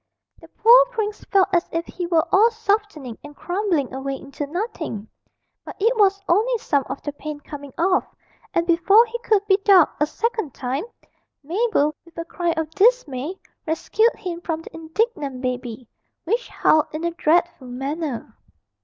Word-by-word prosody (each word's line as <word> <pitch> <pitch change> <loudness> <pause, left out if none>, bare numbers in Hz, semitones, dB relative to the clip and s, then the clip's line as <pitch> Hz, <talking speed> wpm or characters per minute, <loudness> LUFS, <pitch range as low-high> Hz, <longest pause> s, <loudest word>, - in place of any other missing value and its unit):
The - - -15
poor 485 +3 +6
prince 435 -4 -4
felt 390 -1 +3
as 345 -1 +2
if 330 +1 -2
he 355 -1 -5
were 335 -1 +2
all 430 +4 +6
softening 410 - -2
and 290 0 -11
crumbling 350 -8 -1
away 270 +1 -3
into 280 +1 -7
nothing, 320 - -4 0.6
but - - -9
it 455 +5 +2
was 395 -2 +3
only 445 +8 +2
some 285 -10 0
of 265 - -6
the 290 - -4
paint 295 0 -7
coming 285 -2 -9
off; 365 +3 +2 0.5
and 335 - +1
before 365 +7 +5
he 475 +1 -6
could 425 -4 +1
be 385 -2 +4
ducked 390 -7 +4
a 300 - +4
second 440 - -2
time, 265 - -3 0.6
Mabel, 340 -2 +1
with 335 -1 -21
a 335 - -4
cry 345 0 -2
of 320 -1 -3
dismay, 380 - +1 0.3
rescued 435 +8 +1
him 345 -2 -6
from 325 -2 -3
the - - -12
indignant 320 - -2
baby, 250 -2 -4 0.4
which 460 +8 -1
howled 310 0 +3
in 310 +2 -4
a 340 - 0
dreadful 335 -4 +1
manner. 270 +1 -4
335 Hz, 165 wpm, -22 LUFS, 290-415 Hz, 0.6 s, poor